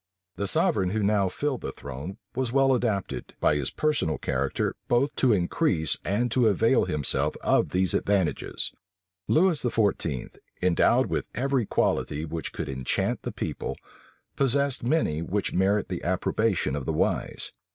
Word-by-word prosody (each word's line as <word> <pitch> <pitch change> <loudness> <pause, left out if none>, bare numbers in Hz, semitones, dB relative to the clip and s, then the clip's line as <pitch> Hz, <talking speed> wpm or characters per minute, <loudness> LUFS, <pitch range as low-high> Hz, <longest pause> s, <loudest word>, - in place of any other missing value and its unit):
The 100 - -2
sovereign 95 0 +2
who 105 +2 -1
now 100 -2 +2
filled 140 +5 -2
the - - -4
throne 70 +8 -7 0.2
was 130 -2 -1
well 135 0 +4
adapted, 110 -6 -2
by - - +3
his 70 -3 -1
personal 150 - 0
character, - - -1
both 135 +4 +2
to 130 - +4
increase 90 - +2
and 115 +6 0
to 120 -1 +3
avail 115 +5 +3
himself 75 -3 0
of - - +3
these 95 0 +1
advantages. 95 -8 0 0.6
Lewis 170 -1 +3
XIV., 100 - -1 0.2
endowed 90 -2 +3
with - - -2
every 130 -2 0
quality 75 +2 0
which 80 0 -5
could - - -5
enchant 65 -2 -1
the - - -4
people, - - -4 0.6
possessed 140 0 +1
many 120 - +1
which 100 +4 -2
merit 100 +2 +2
the 90 - -5
approbation 95 -3 0
of 70 -3 -5
the 80 - 0
wise. - - -1
100 Hz, 150 wpm, -26 LUFS, 85-125 Hz, 0.6 s, well